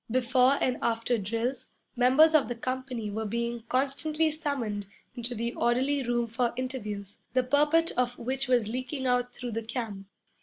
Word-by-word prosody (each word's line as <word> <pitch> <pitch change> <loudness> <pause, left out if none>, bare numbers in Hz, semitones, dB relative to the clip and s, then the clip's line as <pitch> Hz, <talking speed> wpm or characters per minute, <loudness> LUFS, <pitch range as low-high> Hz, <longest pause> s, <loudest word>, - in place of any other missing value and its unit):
Before 255 +2 +3
and 250 -1 0
after 230 +1 +1
drills, 230 +6 -2 0.3
members 260 +6 +6
of 290 -7 +4
the 240 - -3
company 255 -3 -3
were 220 +1 -3
being 235 +2 -2
constantly 305 +5 +1
summoned 260 - -3 0.3
into 245 0 -4
the 235 +2 -2
orderly 260 +4 +1
room 240 -1 0
for 235 +1 -1
interviews, 210 -6 -5
the 255 0 +3
purport 295 +5 +3
of 245 0 0
which 260 +2 -2
was 245 -4 +3
leaking 255 +4 -3
out 245 -1 +1
through 245 -1 -5
the 225 +1 -2
camp. 220 -4 -5
245 Hz, 160 wpm, -28 LUFS, 230-265 Hz, 0.3 s, members